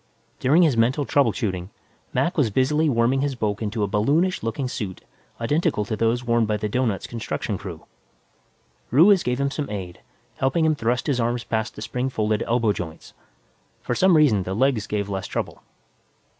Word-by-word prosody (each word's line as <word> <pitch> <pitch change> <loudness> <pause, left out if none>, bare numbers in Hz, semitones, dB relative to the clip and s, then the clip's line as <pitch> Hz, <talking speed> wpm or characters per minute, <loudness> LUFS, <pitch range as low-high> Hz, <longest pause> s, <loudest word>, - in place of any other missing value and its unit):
During 155 +7 +4
his 150 -7 +3
mental 125 +6 +2
trouble 140 -5 +3
shooting, 95 -6 -3 0.4
Mac 170 - 0
was 145 -8 +2
busily 150 +8 +2
worming 125 +2 +2
his 140 -1 -1
bulk 105 -3 -2
into 110 0 -2
a - - +1
balloonish 145 - +1
looking 115 +4 -2
suit 105 -7 -5 0.4
identical 145 - 0
to 110 - -2
those 115 +3 +1
worn 115 -2 +2
by 105 0 0
the 105 - -2
doughnut's 110 -4 -1
construction 115 -2 -4
crew. 90 -4 -8 1.0
Ruiz 180 - +6
gave 125 +1 -1
him 140 0 0
some 145 +1 -4
aid, 95 -4 -6 0.4
helping 135 +5 +1
him 160 - +3
thrust 120 -3 -1
his 140 -5 0
arms 120 0 0
past 110 +1 -2
the - - -7
spring 125 +1 -2
folded 110 -3 0
elbow 115 -3 +2
joints. 80 -4 -8 0.7
For - - -1
some 180 +5 +4
reason, 130 -10 +4
the 95 +1 -4
legs 120 -3 +1
gave 100 -1 -2
less 95 -2 -4
trouble. - - -4
120 Hz, 180 wpm, -23 LUFS, 105-140 Hz, 1.0 s, Ruiz